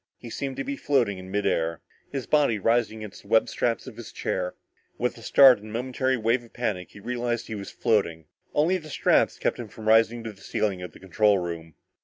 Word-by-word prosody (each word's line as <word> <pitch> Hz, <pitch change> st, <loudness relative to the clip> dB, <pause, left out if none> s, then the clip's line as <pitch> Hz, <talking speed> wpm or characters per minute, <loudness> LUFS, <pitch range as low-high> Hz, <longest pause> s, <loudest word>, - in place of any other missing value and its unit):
He 120 Hz, -, -10 dB
seemed 135 Hz, +2 st, -4 dB
to -, -, -2 dB
be 280 Hz, +1 st, -3 dB
floating 120 Hz, -, +1 dB
in 95 Hz, 0 st, -10 dB
mid 105 Hz, +1 st, -1 dB
air, 80 Hz, 0 st, 0 dB, 0.3 s
his 135 Hz, -3 st, -3 dB
body 145 Hz, -7 st, +3 dB
rising 110 Hz, 0 st, +1 dB
against 105 Hz, -, -9 dB
the -, -, -19 dB
webbed 110 Hz, +1 st, +3 dB
straps 115 Hz, -1 st, -1 dB
of 125 Hz, -4 st, -10 dB
his 120 Hz, -, -9 dB
chair! 90 Hz, -1 st, -3 dB, 0.4 s
With -, -, -1 dB
a -, -, -13 dB
start 130 Hz, -5 st, +7 dB
and 105 Hz, -, -12 dB
a -, -, -9 dB
momentary 130 Hz, +2 st, 0 dB
wave 115 Hz, +2 st, +1 dB
of 115 Hz, -, -18 dB
panic, 100 Hz, -7 st, -2 dB
he -, -, -13 dB
realized 120 Hz, +1 st, -2 dB
that -, -, -16 dB
he -, -, -2 dB
was 100 Hz, -1 st, -6 dB
floating! 90 Hz, -9 st, 0 dB, 0.3 s
Only 165 Hz, +5 st, +3 dB
the 155 Hz, -3 st, -10 dB
straps -, -, +2 dB
kept -, -, -1 dB
him 120 Hz, -, -5 dB
from 110 Hz, +1 st, -10 dB
rising 115 Hz, +1 st, +4 dB
to 110 Hz, -1 st, -6 dB
the 95 Hz, -, -20 dB
ceiling 100 Hz, -4 st, -1 dB
of 90 Hz, -, -7 dB
the -, -, -14 dB
control 100 Hz, +2 st, +3 dB
room! 85 Hz, -3 st, -5 dB
110 Hz, 235 wpm, -26 LUFS, 100-125 Hz, 0.4 s, start